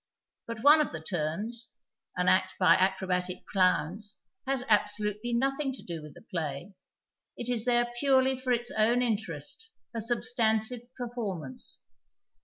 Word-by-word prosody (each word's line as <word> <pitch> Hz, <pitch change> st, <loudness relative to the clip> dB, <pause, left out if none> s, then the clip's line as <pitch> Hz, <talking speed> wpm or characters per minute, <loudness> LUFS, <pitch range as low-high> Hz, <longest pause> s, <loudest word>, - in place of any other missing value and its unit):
But 230 Hz, -1 st, -6 dB
one 300 Hz, +2 st, +8 dB
of 300 Hz, -, -1 dB
the 160 Hz, -, -6 dB
" 160 Hz, -, -5 dB
turns," 205 Hz, +10 st, -2 dB, 0.4 s
an 180 Hz, 0 st, +1 dB
act 185 Hz, -, +3 dB
by 180 Hz, -3 st, +6 dB
acrobatic 185 Hz, -1 st, 0 dB
clowns, 185 Hz, +2 st, +1 dB, 0.3 s
has 270 Hz, -2 st, +1 dB
absolutely 210 Hz, +1 st, +1 dB
nothing 270 Hz, +3 st, 0 dB
to 255 Hz, -, -9 dB
do 170 Hz, -2 st, -6 dB
with 150 Hz, -1 st, -11 dB
the -, -, -14 dB
play; 165 Hz, +2 st, -5 dB, 0.6 s
it 240 Hz, -, -3 dB
is 240 Hz, -2 st, +1 dB
there 240 Hz, -1 st, +2 dB
purely 265 Hz, -1 st, +3 dB
for 255 Hz, 0 st, -3 dB
its 240 Hz, 0 st, 0 dB
own 230 Hz, +3 st, +3 dB
interest, 215 Hz, -, -3 dB, 0.2 s
a 230 Hz, -, -2 dB
substantive 230 Hz, 0 st, +1 dB, 0.2 s
})cr 250 Hz, -, -3 dB
formance. 180 Hz, -, -3 dB
220 Hz, 150 wpm, -29 LUFS, 180-245 Hz, 0.6 s, one